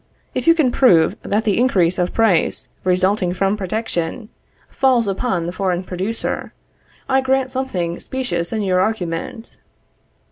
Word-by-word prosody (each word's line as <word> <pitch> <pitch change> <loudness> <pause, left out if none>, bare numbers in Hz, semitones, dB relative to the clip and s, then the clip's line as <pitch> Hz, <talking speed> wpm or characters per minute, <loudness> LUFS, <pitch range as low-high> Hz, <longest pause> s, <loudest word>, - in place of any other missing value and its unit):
If - - -3
you 330 - +7
can 295 -7 +2
prove 175 -12 +4
that 210 +2 -1
the 215 -2 +1
increase 185 -8 +2
of 180 0 0
price 215 -8 +1 0.2
resulting 185 0 +1
from 195 +2 +1
protection, 210 0 -3 0.4
falls 250 -4 +2
upon 195 -3 -1
the 175 - -3
foreign 185 -1 -1
producer, 190 +5 -3 0.5
I 265 0 +3
grant 260 0 0
something 185 -11 -3
specious 175 -11 -3
in 220 -2 -1
your 185 -2 +1
argument. 205 +2 -3
200 Hz, 140 wpm, -19 LUFS, 180-245 Hz, 0.5 s, you